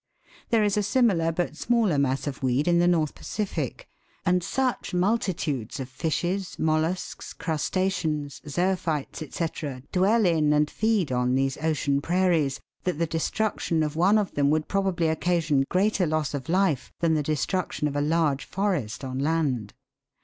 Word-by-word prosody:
There 225 -2 +3
is 205 0 +1
a - - +3
simi 235 +2 +3
lar, 165 -1 +1
but 165 -2 -2
smaller 220 -7 +2
mass 135 -1 0
of 140 -2 -5
weed 130 +3 +1
in 170 0 +4
the 175 - +4
North 160 -4 +2
Pacific; 175 - -4 0.4
and 180 +1 +3
such 255 -3 -1
mul 200 +6 +3
titudes 150 - -3
of 130 -1 -5
fishes, 175 +7 -2
mollusks, 160 +3 -1
crus 160 -3 -2
taceans, 160 -7 -1
zoophytes, 170 -3 -1
&c., 150 -6 -4
dwell 205 +4 +3
in 155 -4 +3
and 150 0 +2
feed 215 -9 +1
on 125 0 +1
these 135 0 0
ocean 145 -3 0
prairies, 165 -5 +1 0.2
that 180 -4 -1
the 170 - +1
destruction 165 0 -1
of 150 0 -2
one 185 +6 +4
of 205 -3 0
them 140 -1 +2
would 155 0 +1
probably 190 -4 0
occasion 160 -3 +1
greater 190 -1 +2
loss 155 -2 -1
of 140 +2 -5
life 180 -6 +1
than 165 -1 +2
the 155 - +2
destruction 155 +2 -1
of 145 - -4
a 145 - +1
large 150 -2 +1
forest 175 - -2
on 130 0 -4
land. 140 -8 0
160 Hz, 165 wpm, -26 LUFS, 145-185 Hz, 0.4 s, in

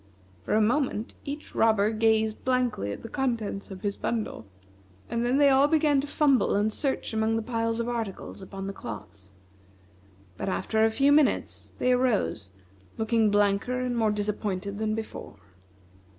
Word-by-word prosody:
For - - +1
a 220 - +4
moment 235 -1 0
each 290 +2 -6
robber 220 -2 +3
gazed 220 -1 +1
blankly 250 - 0
at - - -7
the - - -6
contents 230 -6 -2
of 190 -2 -9
his 200 -1 -2
bundle, 220 - -3 0.6
and 235 0 0
then 245 +3 +2
they 285 -1 +6
all 270 +1 +5
began 295 -2 +3
to 290 - -6
fumble 280 -3 +2
and 210 +2 +1
search 270 -4 -2
among 220 0 +1
the 225 - -1
piles 230 -1 -1
of 235 - -1
articles 225 -5 -4
upon 195 0 -7
the 195 - -4
cloths; 100 - -9 1.1
but - - -3
after 220 +3 0
a 225 - +5
few 275 +6 +3
minutes, 295 -1 +1
they 255 - +2
arose, 250 - +1 0.5
looking 220 -1 +2
blanker 205 +4 +1
and 250 -1 -1
more 225 -2 +2
disappointed 205 -1 -2
than 215 0 0
before. 220 - -7
225 Hz, 165 wpm, -27 LUFS, 205-250 Hz, 1.1 s, they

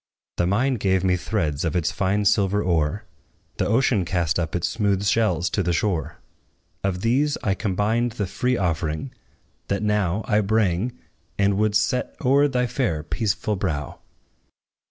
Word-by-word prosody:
The 85 - +1
mine 125 +7 +1
gave 95 -2 +1
me 90 -1 +3
threads 85 -6 -2
of 80 -1 -1
its 85 -2 +1
fine 100 +2 0
silver 100 0 +2
ore; 85 +4 0 0.5
The - - 0
ocean 115 -3 +2
cast 85 -1 0
up 80 -1 -2
its 85 - 0
smooth 100 -3 0
shells 100 -5 +2
to 100 - 0
the 90 -1 0
shore: 80 -2 -1 0.7
Of 95 -2 -1
these 135 +7 +1
I 100 - +2
combined 110 +4 0
the 105 - -2
free 125 +6 -1
offering, 85 - -2 0.6
that 100 +1 -1
now 105 -1 0
I 105 -3 +3
bring, 110 +2 0 0.4
and 100 0 +2
would 105 0 +1
set 125 +4 0
o'er 140 +3 +5
thy 125 -3 0
fair, 120 - -1
peaceful 105 +7 -1
brow. 80 -7 -3
100 Hz, 155 wpm, -23 LUFS, 90-110 Hz, 0.7 s, o'er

